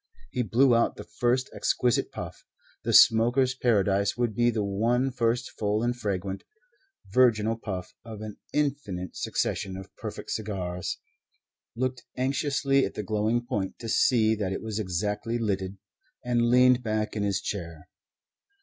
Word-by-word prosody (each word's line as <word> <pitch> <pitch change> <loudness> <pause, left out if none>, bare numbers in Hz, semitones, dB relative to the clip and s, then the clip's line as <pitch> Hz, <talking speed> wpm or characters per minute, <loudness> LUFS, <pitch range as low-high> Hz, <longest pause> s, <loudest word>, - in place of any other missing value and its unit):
He 125 - -1
blew 120 +3 +4
out 115 - +2
the - - -8
first 125 +1 0
exquisite 125 -2 +1
puff - - -7 0.4
the - - -1
smoker's 120 +3 +6
paradise 100 -5 +1
would 120 -2 0
be 120 +3 +3
the 110 -3 0
one 115 +7 +1
first 120 -1 0
full 105 +1 +1
and 120 0 0
fragrant, 100 -4 -3 0.7
virginal 115 -3 +4
puff 95 -5 -6
of 110 -3 -9
an 110 -1 -7
infinite 135 - -2
succession 95 -1 -2
of 95 - -11
perfect - - -7
cigars 95 -5 -3 0.8
looked 130 +1 -2
anxiously 135 +1 +1
at - - -3
the 105 - -3
glowing 110 +4 0
point 105 -7 -3
to 115 - -7
see 110 -1 +3
that 105 -4 -2
it 95 - -4
was 110 -1 -3
exactly 105 +4 -2
lighted, 100 -4 -2 0.5
and 120 -1 +2
leaned 125 +1 +5
back 110 -2 -2
in 105 - -1
his 100 -1 0
chair. 85 -6 -6
110 Hz, 150 wpm, -27 LUFS, 100-125 Hz, 0.8 s, smoker's